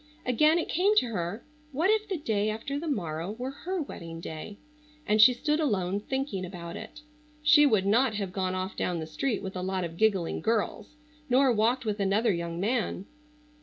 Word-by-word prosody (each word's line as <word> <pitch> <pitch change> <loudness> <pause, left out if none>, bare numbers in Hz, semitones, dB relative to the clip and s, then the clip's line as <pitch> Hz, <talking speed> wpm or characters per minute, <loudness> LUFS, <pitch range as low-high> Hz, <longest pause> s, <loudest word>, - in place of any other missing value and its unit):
Again 305 +7 +4
it 340 - -1
came 395 +5 +2
to 250 - +3
her 200 +1 -4 0.3
what 325 +9 +2
if 430 -1 +1
the 380 - -1
day 215 -8 0
after 250 +7 -3
the 330 - -5
morrow 175 - -2
were 250 +4 -5
her 365 +7 -4
wedding 165 - -7
day 165 +5 -7 0.5
and 215 +1 +4
she 240 +4 +9
stood 300 +5 0
alone 200 - 0
thinking 265 -4 -3
about 175 -2 -7
it. 300 - -9 0.4
She 300 -1 +7
would 215 -7 +2
not 225 +3 +3
have 195 -3 -3
gone 185 -1 -1
off 185 +1 -3
down 180 - -1
the 160 - -4
street 210 - -2
with 190 0 -6
a 180 - -3
lot 190 0 -2
of 170 -1 -6
giggling 195 -5 +1
girls 220 +3 -1 0.3
nor 260 +1 +4
walked 235 +3 +1
with 210 -1 -2
another 205 +3 +2
young 170 0 -4
man. 210 -2 -1
215 Hz, 195 wpm, -28 LUFS, 185-270 Hz, 0.5 s, she